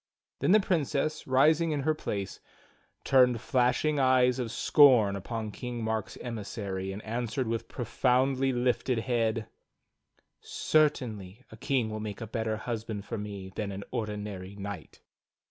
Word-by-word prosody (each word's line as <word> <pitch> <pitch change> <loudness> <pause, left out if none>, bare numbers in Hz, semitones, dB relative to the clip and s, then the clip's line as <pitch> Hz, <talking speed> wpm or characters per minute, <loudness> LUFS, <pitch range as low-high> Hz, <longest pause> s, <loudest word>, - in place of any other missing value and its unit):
Then - - +2
the 215 - +7
Princess, 155 -5 -1
rising 155 +5 +4
in 150 -2 -1
her 155 +3 +2
place, 100 -10 -4 0.6
turned 125 -3 +4
flashing 130 +5 +1
eyes 130 -1 +4
of 120 -3 -3
scorn 125 -9 +5
upon 110 +2 -4
KingMark's 110 -3 -4
emissary 100 -4 -5
and 100 +2 -7
answered 120 +3 -2
with 115 0 -2
proudly 130 +2 +1
lifted 125 0 0
head: 115 -2 0 0.9
"Certainly, 125 -9 0
a - - -10
king 120 -2 0
will 110 - -4
make 105 -2 -5
a 115 - -5
better 110 0 -2
husband 110 -2 -5
for 115 - -4
me 100 -2 -6
than 105 -1 -3
an 100 +1 -6
ordinary 105 -3 -5
knight." 100 -4 -8
115 Hz, 135 wpm, -29 LUFS, 105-130 Hz, 0.9 s, the